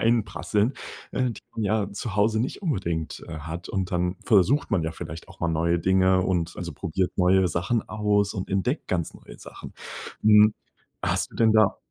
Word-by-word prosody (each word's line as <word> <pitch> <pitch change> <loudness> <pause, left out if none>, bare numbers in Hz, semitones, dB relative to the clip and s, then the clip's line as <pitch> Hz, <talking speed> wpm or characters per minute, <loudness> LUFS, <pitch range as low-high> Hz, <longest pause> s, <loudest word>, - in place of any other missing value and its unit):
einprasseln, 110 0 +1 0.4
und, 125 -3 -1 0.2
ja 105 -2 0
zu 100 0 -5
Hause 110 +2 +3
nicht 130 - -3
unbedingt, 85 - -2
äh, 80 -1 -6
hat. 80 +3 -7
Und 95 -2 -2
dann 90 0 0
versucht 110 - +3
man 95 -5 +2
ja 80 0 -2
vielleicht 80 0 -8
auch - - -15
mal 85 - +1
neue 85 +1 +1
Dinge 95 +1 +3
und 90 -3 -1
also, - - -5
probiert 90 +3 -2
neue 95 0 +4
Sachen 90 +7 -1
aus 105 -1 +1
und 95 - -4
entdeckt 100 - -1
ganz 85 -3 -1
neue - - -13
Sachen. - - -11 0.5
Hm, 105 0 +6 0.5
hast - - 0
du - - -11
denn 110 -1 +4
da 110 -3 +4
95 Hz, 175 wpm, -25 LUFS, 90-110 Hz, 0.5 s, Hm